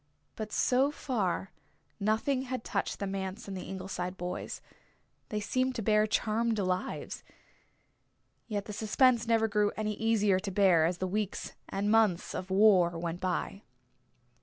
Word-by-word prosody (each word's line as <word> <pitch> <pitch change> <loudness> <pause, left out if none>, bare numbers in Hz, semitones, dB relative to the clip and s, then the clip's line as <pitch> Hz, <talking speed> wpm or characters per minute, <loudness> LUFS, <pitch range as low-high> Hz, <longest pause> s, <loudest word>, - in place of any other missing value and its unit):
But 215 -1 -5
so 260 +3 +3
far 200 - -2 0.5
nothing 220 +6 +1
had 255 -2 -4
touched 200 - -2
the 200 - -3
manse 195 +3 -4
and 195 - -5
the 185 - -6
Ingleside 185 -1 -4
boys. 180 +1 -4 0.7
They 210 -4 -2
seemed 255 +5 0
to 225 - -3
bear 215 0 +3
charmed 225 +1 +1
lives. 185 -2 -2 1.2
Yet 205 -3 -3
the 210 - -6
suspense 235 +3 +3
never 225 -1 +3
grew 210 -1 +2
any 215 0 -1
easier 210 -3 +2
to 195 +1 -4
bear 185 -4 +4
as 175 +1 0
the 185 - -2
weeks 205 +1 -3 0.2
and 205 +2 0
months 215 -6 +3
of 185 - -5
war 190 -4 +5
went 170 +1 -3
by. 185 +2 -2
205 Hz, 150 wpm, -30 LUFS, 185-225 Hz, 1.2 s, war